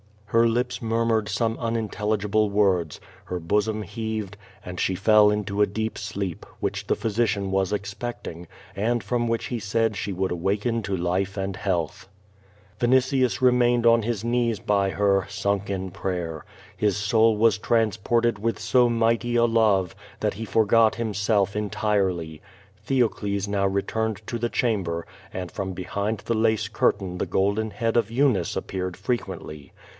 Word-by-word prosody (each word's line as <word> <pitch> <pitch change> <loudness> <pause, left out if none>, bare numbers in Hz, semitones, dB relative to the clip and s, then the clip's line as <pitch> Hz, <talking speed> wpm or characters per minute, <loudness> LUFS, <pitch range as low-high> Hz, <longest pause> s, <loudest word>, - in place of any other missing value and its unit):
^' - - -21
Her 115 0 +5
lips 120 +2 -1
murmured 115 -1 +1
some 115 +1 -1
unintelligible 110 -2 0
words, 95 -6 +1 0.2
her 90 - -3
bosom 105 +5 0
heaved, 110 -1 -4 0.3
and 90 0 -6
she 95 - +1
fell 105 +2 +5
into 105 -1 -1
a 105 - +5
deep 110 +3 -3
sleep, 100 -5 -4 0.2
which - - -2
the - - +2
physiciaii 110 -2 0
was 95 0 0
expecting, 100 -4 -5 0.3
and 115 +3 0
from 120 +3 0
which 115 0 -1
he 120 - -3
said 110 +1 0
she 100 - -3
would 95 +1 -1
awaken 100 +6 0
to 100 -1 -2
life 90 +2 -1
and 95 -1 -3
health. 95 -1 -2 0.7
Vinitius 130 +1 +2
remained 120 -1 +4
on 115 -1 +5
his 110 -2 -2
knees 120 -2 0
by 100 -1 +1
her, 100 -1 +1
sunk 100 -1 -1
in 95 -1 -3
prayer. 85 -4 -4 0.3
His 105 -3 +1
soul 110 +1 +3
was 110 0 +4
transported 115 0 +1
with 115 +2 -1
so 125 -2 +3
mighty 115 +1 +1
a 120 0 +5
love, 110 -6 +2 0.3
that - - 0
he 115 +3 -5
for 110 +1 +2
got 110 +1 +4
himself 105 -2 0
entirely. 100 -7 -1 0.5
Theocles 105 -6 0
now 100 -1 +1
returned 105 +2 -1
to 120 - -3
the 120 +1 -1
chamber, 95 -10 -1 0.3
.and 90 -2 -5
from 95 -2 -4
behind 100 +4 -3
the 115 - -2
lace 110 -1 +1
curtain 95 -4 0
the - - -1
golden 100 +3 +1
head 115 +2 -1
of 115 -3 +2
Eunice 120 -7 +1
appeared 90 -2 -3
frequently. 95 - -4
105 Hz, 155 wpm, -25 LUFS, 95-115 Hz, 0.7 s, Her